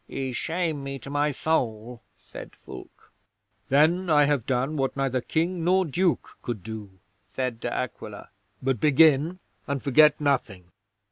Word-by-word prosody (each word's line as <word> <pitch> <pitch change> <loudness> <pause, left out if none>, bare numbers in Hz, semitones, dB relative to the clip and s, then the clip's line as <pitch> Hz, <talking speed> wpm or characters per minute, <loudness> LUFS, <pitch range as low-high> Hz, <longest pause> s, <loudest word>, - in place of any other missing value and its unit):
'"Ye 135 -1 -4
shame 160 +2 -2
me 135 0 -5
to 135 +2 -10
my 145 +1 +1
soul," 120 -6 -2 0.2
said - - -11
Fulke. - - -13 0.6
'"Then 165 +6 +3
I 150 -2 +5
have 140 -5 0
done 130 +4 0
what 135 -1 -1
neither 130 -2 0
King 170 +5 -1
nor 185 +2 +3
Duke 170 +3 -1
could 110 -6 -5
do," 105 -3 -8 0.3
said 120 +4 -4
De - - -3
Aquila. 125 -4 -5 0.3
"But 130 -3 0
begin, 155 - +4 0.3
and 140 -1 -1
forget 150 +1 +5
nothing." 110 -11 -1
140 Hz, 145 wpm, -26 LUFS, 125-155 Hz, 0.6 s, I